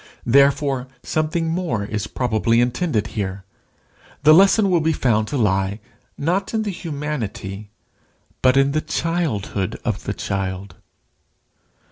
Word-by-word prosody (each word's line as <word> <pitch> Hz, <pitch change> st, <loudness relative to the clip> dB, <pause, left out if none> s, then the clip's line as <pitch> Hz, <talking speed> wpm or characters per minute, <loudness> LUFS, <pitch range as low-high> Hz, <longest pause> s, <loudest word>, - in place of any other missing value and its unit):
Therefore 140 Hz, 0 st, +3 dB, 0.2 s
something 155 Hz, +1 st, -1 dB
more 160 Hz, -, -1 dB
is 105 Hz, 0 st, -3 dB
probably 115 Hz, -1 st, +1 dB
intended 125 Hz, -, 0 dB
here. 95 Hz, -2 st, -4 dB, 0.8 s
The 155 Hz, +1 st, +8 dB
lesson 195 Hz, +3 st, +5 dB
will 175 Hz, -, +4 dB
be 160 Hz, +1 st, +2 dB
found 110 Hz, -6 st, +1 dB
to 145 Hz, -, -2 dB
lie 100 Hz, -2 st, +1 dB, 0.4 s
not 180 Hz, +9 st, -1 dB
in 220 Hz, -, +1 dB
the 205 Hz, -, -2 dB
humanity, 140 Hz, -, -5 dB, 0.7 s
but 130 Hz, +1 st, +4 dB
in 135 Hz, 0 st, +4 dB
the 155 Hz, +2 st, 0 dB
childhood 145 Hz, -, -2 dB
of -, -, -2 dB
the -, -, -2 dB
child. 95 Hz, 0 st, -3 dB
135 Hz, 125 wpm, -21 LUFS, 105-160 Hz, 0.8 s, The